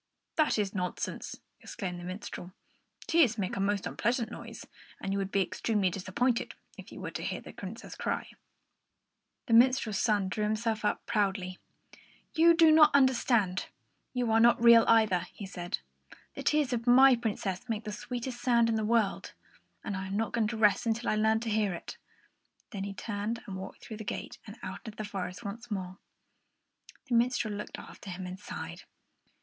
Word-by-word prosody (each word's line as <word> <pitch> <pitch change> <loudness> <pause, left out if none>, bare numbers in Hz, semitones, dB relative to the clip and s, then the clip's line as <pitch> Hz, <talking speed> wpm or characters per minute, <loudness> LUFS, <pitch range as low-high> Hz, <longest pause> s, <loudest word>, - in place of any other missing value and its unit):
"That 310 -6 +3
is 205 -2 -1
nonsense!" 180 -3 -4 0.2
exclaimed 180 -3 -5
the - - -9
minstrel. 185 0 -7 0.5
"Tears 305 -9 +4
make 190 -3 -2
a - - -3
most 200 0 0
unpleasant 235 0 -1
sound, - - -8 0.4
and 195 - -3
you 200 - 0
would 195 0 -3
be 195 - +3
extremely 200 -1 0
disappointed 225 +7 -1 0.2
if - - -12
you - - -9
were - - -5
to - - -5
hear - - -2
the - - -11
Princess - - -8
cry." - - -3 1.1
The 230 - -1
minstrel's 235 -3 +4
son 205 -4 +2
drew 210 +3 -2
himself 220 +1 -1
up 210 - 0
proudly. 195 -4 -1 0.7
"You 335 0 +6
do 325 -2 +7
not 305 -2 +7
understand; 235 -8 +3 0.4
you 245 -3 0
are 225 - +5
not 235 +1 +5
real 235 -1 +8
either," 220 -6 +4
he 205 - -7
said. 175 -2 -4 0.6
"The - - -6
tears 300 -4 +2
of 235 0 -3
my 260 +2 +8
Princess 205 -5 -3
make 220 -1 -2
the 215 - -5
sweetest 240 +3 -5
sound 235 -2 +3
in 225 - +1
the 220 - -1
world, 220 -2 +1 0.5
and 205 - -3
I 190 0 -4
am 195 +1 -2
not 225 0 -1
going 225 -2 +2
to 220 +1 -4
rest 210 +1 +3
until 230 +1 0
I - - +2
learn 220 +1 +3
how - - -4
to 235 - -3
hear 210 -4 +1
it." - - -8 0.7
Then 200 -3 -4
he 200 0 -6
turned 210 +2 -3
and 195 - -6
walked 190 0 -8
through 220 - -7
the 220 - -6
gate - - -5
and 205 +3 -9
out 185 - -5
into 220 -2 -7
the 215 - -4
forest 185 -1 -5
once 225 +4 -7
more. 185 -2 -4 1.1
The 260 - -4
minstrel 235 -2 +2
looked 205 +1 -6
after 200 - -11
him 185 +1 -6
and 180 +1 -7
sighed. - - -7
215 Hz, 190 wpm, -30 LUFS, 195-235 Hz, 1.1 s, real